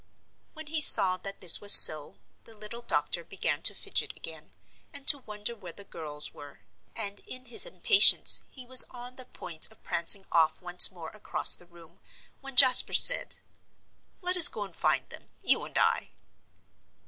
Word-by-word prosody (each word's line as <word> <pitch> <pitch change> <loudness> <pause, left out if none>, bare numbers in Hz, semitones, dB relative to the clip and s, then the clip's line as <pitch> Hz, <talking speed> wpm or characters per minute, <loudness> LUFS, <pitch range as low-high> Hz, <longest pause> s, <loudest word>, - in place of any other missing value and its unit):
When 315 -1 -17
he 310 +1 -7
saw 185 -9 +2
that 195 +2 -12
this 180 -3 +3
was 205 0 0
so, 150 -2 +7 0.3
the 225 -1 -20
little 215 +3 -14
doctor - - -6
began - - -9
to - - +3
fidget - - -8
again, - - -15 0.4
and 285 -2 -14
to 285 -1 +4
wonder 210 -1 -11
where 180 -6 -17
the 200 - -14
girls 150 -5 -5
were, 145 -7 -20 0.3
and 205 -2 -10
in 255 0 -13
his 245 - 0
impatience 455 -4 +2
he 255 -2 -17
was 255 +1 +6
on 245 0 -16
the 255 - -18
point 170 -6 -6
of 220 - -29
prancing 180 +3 -2
off 160 -2 -4
once 180 -1 +3
more 170 -3 -16
across 215 - +1
the 175 - -14
room, 170 -2 -25 0.4
when 270 -1 -16
Jasper 255 -1 +4
said, - - +2 0.9
"Let 360 +1 -3
us 330 -4 +8
go 215 - -8
and 190 -4 -16
find - - -6
them - - -19
you - - -4
and - - -12
I." - - -5
210 Hz, 175 wpm, -22 LUFS, 175-255 Hz, 0.9 s, us